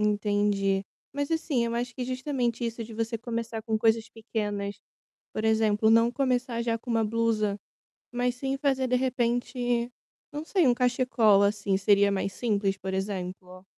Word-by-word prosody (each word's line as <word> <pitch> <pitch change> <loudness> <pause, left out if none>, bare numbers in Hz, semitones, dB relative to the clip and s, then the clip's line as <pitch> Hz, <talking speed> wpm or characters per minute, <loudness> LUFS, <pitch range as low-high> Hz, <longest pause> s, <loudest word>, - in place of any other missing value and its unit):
Entendi. 205 -2 +1 0.3
Mas 285 +1 -2
assim, 310 -7 0
eu 230 - -2
acho 245 +1 -2
que 250 +1 -4
justamente 255 -2 -2
isso 230 0 -3
de 225 0 -10
você 230 +1 -2
começar 230 -1 -4
com 220 -2 0
coisas 225 0 +2
pequenas, 205 -3 -4 0.6
por 215 - -3
exemplo, 220 0 +3
não 230 +1 +5
começar 250 -2 0
já 230 -1 -1
com 245 - -11
uma 225 -1 +2
blusa, 215 -2 0 0.5
mas 245 0 -1
sim 270 +2 -2
fazer, 270 -2 +1
de 250 - +2
repente, 245 -1 0 0.4
não 295 +2 -5
sei, 350 -2 +2
um 245 - +5
cachecol 240 -5 +3
assim 200 -1 +1
seria 200 +1 +4
mais 195 0 -1
simples, 205 -4 0
por 190 0 -5
exemplo? 185 -1 -5
230 Hz, 160 wpm, -27 LUFS, 205-245 Hz, 0.6 s, não